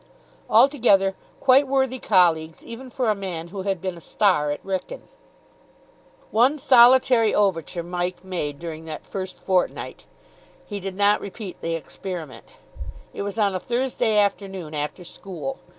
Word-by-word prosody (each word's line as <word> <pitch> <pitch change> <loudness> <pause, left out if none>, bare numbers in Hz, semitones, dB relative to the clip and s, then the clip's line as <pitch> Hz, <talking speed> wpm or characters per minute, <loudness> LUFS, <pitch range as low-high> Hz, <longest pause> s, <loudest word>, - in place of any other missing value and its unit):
Altogether, 220 -9 +4 0.3
quite 270 +1 +5
worthy 265 -1 0
colleagues 165 -6 +2
even 250 +3 -9
for 245 -2 0
a - - +3
man 180 -4 -5
who 195 +1 -6
had 195 -1 -2
been 185 0 -4
a 170 - -12
star 180 -6 +1
at 145 - -4
Wrykyn. 195 - -4 1.3
One 250 +7 +3
solitary 250 -4 +5
overture 180 -4 0
Mike 175 +1 -3
made 170 -6 -3
during 160 0 -7
that 155 -2 -7
first 190 -1 -6
fortnight. 185 -2 -1 0.6
He 205 -2 -5
did 195 0 -6
not 205 +1 +3
repeat 200 -1 -8
the 165 0 -1
experiment. 165 -1 -7 0.7
It - - -5
was 200 +1 -4
on 205 -3 +2
a 185 - -2
Thursday 240 -1 0
afternoon, 195 -5 -1
after 150 +4 -4
school. 195 +9 -7
195 Hz, 145 wpm, -23 LUFS, 175-230 Hz, 1.3 s, quite